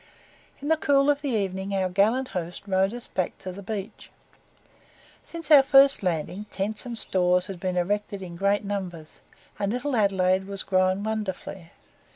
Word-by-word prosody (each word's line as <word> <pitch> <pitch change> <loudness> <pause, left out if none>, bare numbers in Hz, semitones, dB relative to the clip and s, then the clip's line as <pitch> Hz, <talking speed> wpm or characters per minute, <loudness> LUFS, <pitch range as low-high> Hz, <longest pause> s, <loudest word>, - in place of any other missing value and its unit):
In - - -3
the 320 +1 +3
cool 285 -1 +3
of 285 0 -2
the 285 - -2
evening 195 -3 -2
our 190 -1 +1
gallant 215 +8 +1
host 175 0 -5
rowed 190 0 +1
us 240 0 -7
back 185 - -3
to 185 - -7
the 195 +2 -9
beach. 200 0 -6 1.2
Since 335 -1 -6
our 290 -2 +10
first 275 0 +6
landing, 180 +3 -2
tents 210 +5 -3
and 235 -1 -2
stores 180 -3 +2
had 195 -3 -7
been 185 0 -2
erected 200 +2 -2
in 175 -2 -8
great 200 +4 +1
numbers, 180 -6 -6 0.4
and 200 0 0
Little 250 +3 -2
Adelaide 190 -3 +2
was 200 -1 -3
grown 185 +1 +1
wonderfully. 200 -5 -4
200 Hz, 170 wpm, -25 LUFS, 185-225 Hz, 1.2 s, our